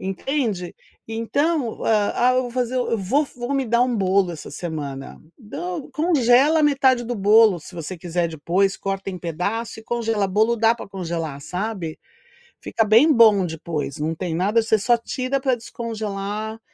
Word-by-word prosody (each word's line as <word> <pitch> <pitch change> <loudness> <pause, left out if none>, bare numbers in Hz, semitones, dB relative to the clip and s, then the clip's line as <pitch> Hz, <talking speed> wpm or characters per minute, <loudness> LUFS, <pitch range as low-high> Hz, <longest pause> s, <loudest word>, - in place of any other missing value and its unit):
entende. 195 -2 -2 0.3
Então: 245 +4 -1
"Ah 220 +3 +2
ah, 255 - +2
eu 255 - +2
vou 245 - -6
fazer 250 0 -2
eu 245 -2 0
vou 255 +11 +1
vou 245 +2 -4
me 270 -1 +1
dar 235 +2 +3
um 250 -1 0
bolo 190 -2 +2
essa 160 - -9
semana". 145 -4 -6 0.2
Do 180 - -6
congela 300 -1 +3
metade 265 -4 +3
do 245 +1 -3
bolo 210 -1 +5
se 180 - -13
você 170 +2 -6
quiser 170 0 -1
depois, 175 +5 0
corta 195 0 -4
em 185 - -7
pedaço 200 +8 -3
e - - -16
congela. 225 -4 -1
Bolo 220 +4 +2
dá 225 +1 +3
pra 235 - -10
congelar, 165 -6 -4
sabe. 180 0 -4 0.6
Fica 225 - 0
bem 230 +9 +5
bom 215 -6 +5
depois, 160 -3 -4
não 155 +2 -1
tem 170 -1 -3
nada 205 +7 +2
você 220 0 +2
só 240 +4 +3
tira 255 +3 -2
pra 260 -2 +2
descongelar 220 -2 -5
215 Hz, 170 wpm, -22 LUFS, 180-240 Hz, 0.6 s, bolo